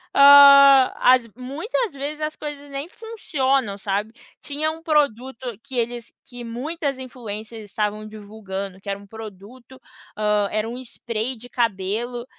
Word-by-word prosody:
hã, 280 -1 +8
as 250 -2 +4
muitas 335 - -3
vezes 290 +2 -6
as 305 0 -3
coisas 290 -1 -8
nem 275 +3 -5
funcionam, 275 - -2
sabe, 205 +3 -3 0.3
tinha 305 +2 -2
um 325 +1 -10
produto 260 -6 -1
que 265 - -9
eles 235 0 -3
que 245 -1 -11
muitas 275 +4 -4
influencers 225 -4 -8
estavam 210 +1 0
estavam 215 0 -9
divulgando 200 -3 -7
que 200 - -9
era 195 - -2
um 200 - -15
produto, 225 +4 -12 0.4
hã, 210 -1 +1
era 215 +1 -1
um 240 - -6
spray 235 -1 -4
de 245 +2 -13
cabelo, 235 +2 -2
245 Hz, 145 wpm, -22 LUFS, 215-280 Hz, 0.4 s, hã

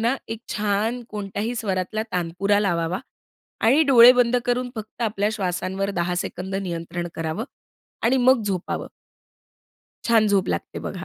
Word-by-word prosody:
ना, 235 +3 +2
एक 225 0 -5
छान 215 +3 -1
कोणत्याही 210 +3 -3
स्वरातला 200 0 -2
तानपुरा 180 +4 +1
लावावा 175 -2 0 0.7
आणि 280 +7 +5
डोळे 250 -2 +9
बंद 245 -1 +3
करून 245 0 0
फक्त 220 +2 -7
आपल्या 210 -2 0
श्वासांवर 190 0 -2
10 175 +1 0
सेकंद 190 +2 -4
नियंत्रण 175 -2 -4
करावं 165 +7 -3 0.6
आणि 245 +4 +3
मग 255 -2 +4
झोपावं. 190 -4 -3 1.2
छान 225 -2 +4
झोप 195 -2 +2
लागते - - -3
बघा. 185 -1 -7
205 Hz, 135 wpm, -23 LUFS, 185-230 Hz, 1.2 s, डोळे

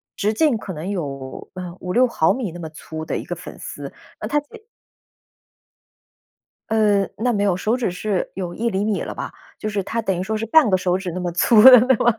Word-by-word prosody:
直 210 +2 0
径 285 -2 +2
可 195 - -7
能 160 +5 -5
有， 140 -8 -5
呃， 180 -2 -6
5-6 235 +8 +2
毫 160 -8 +2
米 240 -8 -3
那 175 - -8
么 160 - -6
粗 155 0 -8
的 - - -2
一 - - -6
个 - - -4
粉 - - -10
丝， - - -7 0.3
那 - - -3
他 295 - +2
借 295 - -15 2.2
呃， 210 -3 +3
那 245 +3 +1
没 205 -2 0
有， 195 -3 +2
手 215 +6 0
指 235 -8 -1
是 190 0 -2
有 180 -2 -5
1 235 +1 -1
厘 195 0 -1
米 215 -2 0
了 - - -5
吧， - - -6 0.3
就 215 - -3
是 200 -2 -2
他 230 +4 -2
等 190 -5 -1
于 - - -1
说 220 +3 -2
是 225 - -3
半 290 -2 +5
个 185 - +3
手 180 0 0
指 185 -2 -5
那 185 - -4
么 175 -1 -2
粗 210 +5 +5
的 255 -2 +11 0.2
嘛。 235 -1 +3
200 Hz, 230 characters per minute, -21 LUFS, 180-225 Hz, 2.2 s, 的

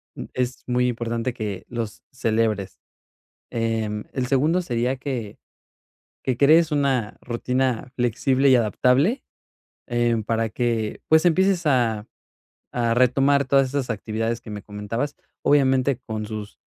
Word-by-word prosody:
mm, - - -6
es 125 0 -2
muy 125 0 +2
importante 115 +1 -2
que 105 -5 -5
los 115 -3 -5
celebres. 110 -5 -1 0.7
Em, 110 -2 -2
el 130 -2 -1
segundo 150 +7 +2
sería 125 -4 -1
que 125 -6 -5 0.9
que 130 - -1
crees 155 +5 +5
una 135 -7 0
rutina 125 +1 -1
flexible 130 +3 +2
y 130 - +7
adaptable. 125 - +2 0.6
Em, 120 -2 +1
para 115 +1 0
que, 115 -2 -1
pues, 160 +2 +5
empieces 185 +1 +3
a 115 -6 +1 0.6
a 120 -1 +1
retomar 135 +3 +3
todas 135 0 +3
esas 135 -1 -2
actividades 115 +1 -2
que 110 - -10
me 105 -1 -6
comentabas, 105 +8 -4 0.3
obviamente, 135 -2 +3
con 110 -4 -5
sus, 105 -1 -7
125 Hz, 130 wpm, -23 LUFS, 115-135 Hz, 0.9 s, y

